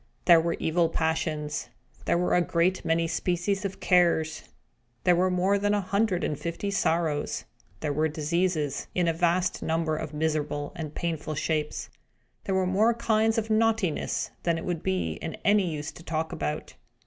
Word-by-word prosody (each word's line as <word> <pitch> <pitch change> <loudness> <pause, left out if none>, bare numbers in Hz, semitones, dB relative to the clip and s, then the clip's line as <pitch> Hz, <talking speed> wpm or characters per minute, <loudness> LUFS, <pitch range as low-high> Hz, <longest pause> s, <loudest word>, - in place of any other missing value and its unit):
There 170 -2 +7
were 170 +1 0
evil 165 +1 +1
Passions; 160 -2 -1 0.4
there - - +2
were 180 - +1
a 180 - +5
great 175 +2 +1
many 165 0 +1
species 180 +4 -1
of 195 - -4
Cares; 170 -3 +3 0.6
there 180 -1 +5
were 185 +2 +3
more 185 +2 +2
than 205 +1 +2
a - - +2
hundred 200 -1 0
and 150 - -2
fifty 170 +4 -3
Sorrows; 160 -6 0 0.4
there 145 - -1
were 155 +2 +2
Diseases, 155 -1 -1
in 180 -1 +2
a 165 - +2
vast 175 +2 +1
number 160 -1 0
of 155 -1 -4
miserable 150 -1 -1
and 155 -4 -6
painful 160 -3 -3
shapes; 150 0 -2 0.6
there 190 - 0
were 190 0 +2
more 210 +5 +3
kinds 225 -1 +2
of 225 0 -1
Naughtiness 220 -6 +1
than 170 -1 +1
it 165 - -5
would 175 -3 -2
be 85 -4 -1
of 160 - -4
any 200 -3 +4
use 150 0 -4
to - - -13
talk 160 -1 -2
about. 75 0 -4
170 Hz, 170 wpm, -27 LUFS, 155-185 Hz, 0.6 s, There